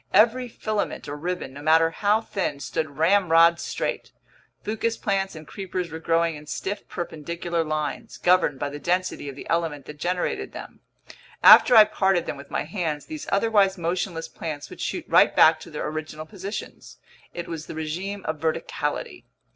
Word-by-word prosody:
Every 235 +5 +4
filament 215 -6 -3
or 145 - -4
ribbon, 175 -2 -4
no 140 - -9
matter 160 +2 +4
how 210 +5 +2
thin, 190 -10 -3
stood 145 0 -4
ramrod 170 -1 +5
straight. - - -3 0.5
Fucus 225 +2 -1
plants 195 -2 -1
and 155 -1 -10
creepers 185 -3 -5
were 160 - -6
growing 165 0 +1
in 150 0 -11
stiff 200 +6 -4
perpendicular 170 0 -3
lines, 155 -1 -4
governed 180 -6 +3
by 145 - -3
the 145 +1 -7
density 180 -3 -1
of 135 - -8
the - - -10
element 165 -4 -1
that 150 0 -10
generated 180 +2 -2
them. - - -9 0.6
After 245 - +9
I 220 - +11
parted 190 -4 +1
them - - -4
with 140 0 -12
my - - -1
hands, 160 -3 -3
these 310 -1 -7
otherwise 200 -2 +3
motionless 170 0 -2
plants 150 -3 -6
would - - -9
shoot - - -3
right - - +5
back - - +6
to - - -11
their - - -4
original 155 0 -5
positions. 200 +3 -8 0.4
It 175 - -5
was 165 -2 -6
the - - -7
regime 180 +6 -4
of 155 -1 -3
verticality. 160 +1 -3
170 Hz, 170 wpm, -25 LUFS, 155-195 Hz, 0.6 s, I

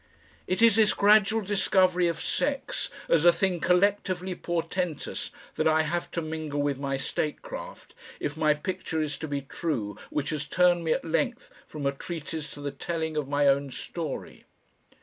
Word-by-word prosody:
It 185 +5 +1
is 225 -2 +6
this 215 -1 +5
gradual 215 +2 +5
discovery 185 -3 +3
of 170 -1 -1
sex 285 - -1 0.2
as 165 -2 +4
a 175 - +8
thing 180 +1 0
collectively 185 0 +2
portentous 175 -1 -3 0.3
that - - +2
I 160 0 +4
have 170 +3 -2
to 170 - -1
mingle 155 -2 -3
with 145 -2 0
my 140 -1 -1
statecraft - - -4 0.3
if 145 - -3
my 155 -1 +3
picture 160 0 -3
is 150 -2 -1
to 160 - -4
be 145 -1 -2
true 130 - -3
which 145 0 -2
has 150 -2 -3
turned 175 0 +3
me 160 - 0
at - - -3
length 240 - -1 0.2
from 150 -2 -6
a 140 - +3
treatise 155 +1 -6
to 145 - -9
the 140 0 -3
telling 160 +2 -3
of 150 -3 -1
my 145 0 +2
own 140 0 +3
story. 155 +2 -6
165 Hz, 170 wpm, -27 LUFS, 150-185 Hz, 0.3 s, a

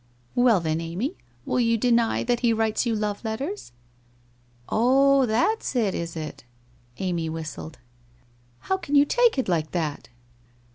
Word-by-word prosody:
'Well 245 -5 +4
then, 160 -1 -1
Amy, 190 - -3 0.3
will - - 0
you 230 -1 +2
deny 235 0 +2
that 240 0 0
he 235 -2 +2
writes 225 +1 0
you 230 - +1
love 210 0 -3
letters?' 270 - -4 1.0
'Ob, 270 +3 +4
that's 250 - 0
it, 215 -6 +1
is 170 0 -4
it?' 155 -1 -6 0.5
Amy 170 -4 -2
whistled. 160 0 -7 0.8
'How 380 - -1
can 290 -6 -3
you 285 0 +7
take 485 - +3
it 260 - 0
like 160 -4 -1
that?' 155 -5 -3
225 Hz, 145 wpm, -25 LUFS, 170-255 Hz, 1.0 s, you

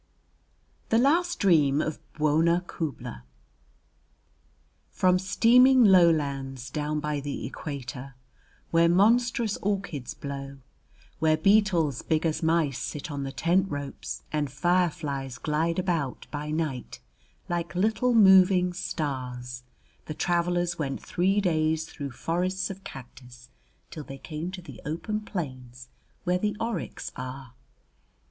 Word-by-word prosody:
] - - -39
THE 225 - +3
LAST 340 +8 +3
DREAM 150 -8 +4
OF 155 0 -2 0.2
BWONA 160 +3 +2
KHUBLA 145 - -5 1.7
From 185 -1 +2
steaming 250 +7 +5
lowlands 140 - +3
down 150 +1 -2
by 150 -1 -2
the 140 0 -5
equator, 135 -1 -7 0.6
where 170 0 +4
monstrous 225 +3 +3
orchids 190 -10 -3
blow, 140 -1 -6 0.6
where 155 0 +3
beetles 175 - +3
big 160 0 0
as 160 -1 0
mice 160 -5 +1
sit 150 +1 -5
on 140 -1 -4
the 135 0 -4
tent 180 +6 +1
ropes, 145 -2 -6
and 150 -2 -1
fireflies 150 -4 0
glide 160 +2 -1
about 170 -8 -1
by 150 0 -4
night 150 -5 -3 0.5
like 175 0 -3
little 220 +6 +2
moving 190 -3 +6
stars, 125 -8 -4 0.4
the 155 - -6
travelers 175 0 0
went 135 -3 -2
three 190 +3 +1
days 160 -4 +1
through 140 -2 -6
forests 185 +8 -2
of 195 0 -10
cactus 125 -2 -12 0.4
till 155 - -7
they 135 -1 -9
came 155 +4 -5
to 185 -1 -8
the - - -11
open 170 +8 -3
plains 130 - -7 0.3
where 180 0 +1
the 210 +1 -1
oryx 230 0 -4
are. 130 -1 -7
160 Hz, 125 wpm, -27 LUFS, 140-185 Hz, 1.7 s, moving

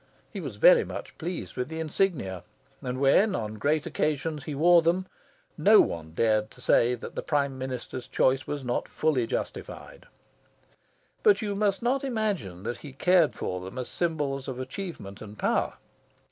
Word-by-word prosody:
He - - -4
was - - -6
very - - +7
much - - -7
pleased 175 +1 -5
with 125 0 -2
the 160 0 -5
insignia, 155 - -1 0.4
and 125 0 -3
when, 185 +9 +4
on 110 -1 -4
great 150 +4 +1
occasions, 150 -1 -1
he 150 - -4
wore 170 +4 +6
them, 175 +3 +1 0.5
no 215 +1 +7
one 80 -1 0
dared 110 +2 +1
say 120 +1 +3
that 115 - -9
the - - -3
Prime 140 -3 0
Minister's 130 -1 -5
choice 130 0 +2
was 145 -2 -4
not 125 -1 -1
fully 140 -7 0
justified. - - -6 1.1
But 410 - +4
you 205 -1 -1
must 200 0 0
not 260 +3 +1
imagine 205 - -2
that 120 +3 -3
he 145 -3 -10
cared 175 +3 +3
for 90 0 -3
them 95 +5 -8
as 125 - -4
symbols 145 -6 -2
of 130 -2 -4
achievement 130 - -7
and 105 0 -10
power. - - 0
145 Hz, 165 wpm, -27 LUFS, 120-180 Hz, 1.1 s, very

